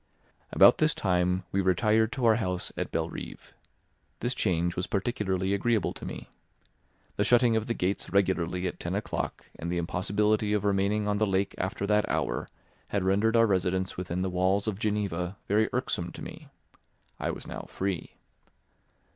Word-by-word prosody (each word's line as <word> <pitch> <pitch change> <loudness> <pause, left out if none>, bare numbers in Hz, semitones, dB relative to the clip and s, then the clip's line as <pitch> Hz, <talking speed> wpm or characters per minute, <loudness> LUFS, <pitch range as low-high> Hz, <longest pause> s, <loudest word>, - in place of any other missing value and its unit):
About - - +7
this - - +3
time 90 0 +1
we 100 - +1
retired 105 +4 +3
to 130 -3 -1
our 110 -1 +5
house 90 -5 -2
at - - -3
Belrive. - - -5 0.7
This 120 - -1
change 85 -5 0
was 90 - -2
particularly 95 -3 -1
agreeable 105 -1 +1
to - - -8
me. - - -7 0.9
The - - +3
shutting 120 -1 +4
of 110 0 0
the 115 - -1
gates 95 +3 -1
regularly 90 -2 +1
at 90 - -3
ten 85 +2 -3
o'clock 105 - -3
and 85 +1 -3
the 90 - -1
impossibility 105 +5 +1
of 105 -1 0
remaining 100 +1 +1
on 105 0 +1
the 110 - +2
lake 95 0 0
after 95 +1 -2
that 105 +1 +2
hour - - -1 0.4
had 100 -2 -1
rendered 100 +4 +2
our 115 0 +6
residence 95 -2 0
within 90 0 -3
the 95 - -1
walls 95 +3 +1
of 105 -2 -2
Geneva 100 -4 -1
very 105 +2 +3
irksome 90 -8 -2
to - - -8
me. - - -9 0.7
I - - -1
was - - -5
now - - -7
free. 95 -2 -3
100 Hz, 170 wpm, -28 LUFS, 90-105 Hz, 0.9 s, About